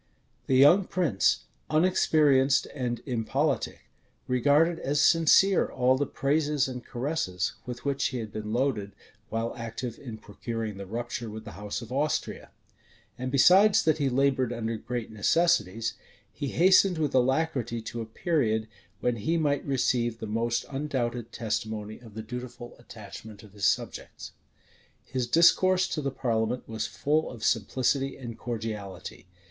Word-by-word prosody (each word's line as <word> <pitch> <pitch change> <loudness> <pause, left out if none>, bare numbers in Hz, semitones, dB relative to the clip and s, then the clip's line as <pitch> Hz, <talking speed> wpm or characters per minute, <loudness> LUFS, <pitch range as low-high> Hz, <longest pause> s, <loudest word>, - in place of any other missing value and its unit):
The 130 - +2
young 150 +9 +6
prince, 135 - +1 0.3
unexperienced 155 -5 +3
and 125 -4 -3
impolitic, 135 +3 -1 0.5
regarded 145 +7 +3
as 145 +2 -1
sincere 165 +5 +5
all 130 0 +3
the 140 +1 -1
praises 145 0 0
and 125 -2 -6
caresses 120 - -2
with 125 +1 -7
which 140 -1 0
he 130 - -1
had 110 -3 -5
been 105 0 -5
loaded 115 -5 -1 0.4
while 115 +1 -2
active 115 0 -6
in 120 -6 -8
procuring 110 0 -5
the 100 -1 -7
rupture 120 +2 -4
with 110 +1 -8
the - - -8
house 105 +4 -5
of 115 - -11
Austria. 145 +4 -2 0.7
And 130 0 -4
besides 190 +9 +6
that 155 -1 +2
he 140 -2 +1
labored 130 -1 +1
under 115 -1 -3
great 120 +1 -5
necessities, 115 - +1 0.4
he 145 - -4
hastened 185 +4 +4
with 150 -3 -1
alacrity 130 -2 +1
to 115 +1 -5
a 110 - -6
period 110 -5 0 0.3
when 120 -1 0
he 160 +11 0
might 145 -3 +1
receive 120 -4 0
the 110 - -6
most 115 +2 -1
undoubted 125 -5 -3
testimony 110 -1 -4
of 115 -4 -15
the 110 - -5
dutiful 120 +1 -8
attachment 110 -2 -11
of 105 -2 -16
his 100 -2 +1
subjects. - - -3 0.7
His 125 -2 -2
discourse 185 +6 +4
to 155 - -2
the 140 - -1
parliament 120 -2 -1
was 110 -1 -3
full 155 +2 0
of 115 -4 -10
simplicity 130 +5 0
and 120 -3 -7
cordiality. 105 -7 -6
125 Hz, 145 wpm, -27 LUFS, 110-145 Hz, 0.7 s, young